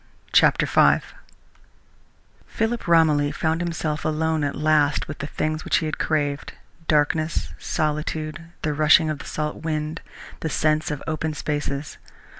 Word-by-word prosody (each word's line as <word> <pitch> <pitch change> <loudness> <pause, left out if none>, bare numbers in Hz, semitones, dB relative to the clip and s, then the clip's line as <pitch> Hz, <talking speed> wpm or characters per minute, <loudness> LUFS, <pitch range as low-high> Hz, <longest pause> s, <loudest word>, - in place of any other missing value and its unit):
CHAPTER - - +5
V - - +4 1.4
Philip 225 -1 -2
Romilly 155 -4 +4
found 160 +1 -1
himself 160 -3 -2
alone 160 0 0
at 145 - -1
last 150 -1 +2
with 145 - -7
the 145 - -4
things 155 +1 -2
which - - +2
he 160 - -1
had 155 - -3
craved 145 -2 -1 0.3
darkness, 150 - +1
solitude, 155 - -2 0.2
the 155 -2 0
rushing 155 +2 +5
of 150 - -5
the - - -9
salt 150 0 -3
wind, 155 -1 -3 0.4
the 160 - -3
sense 155 +2 +1
of 150 -2 -4
open 155 -1 -2
spaces. 145 -1 -3
155 Hz, 140 wpm, -23 LUFS, 150-160 Hz, 1.4 s, CHAPTER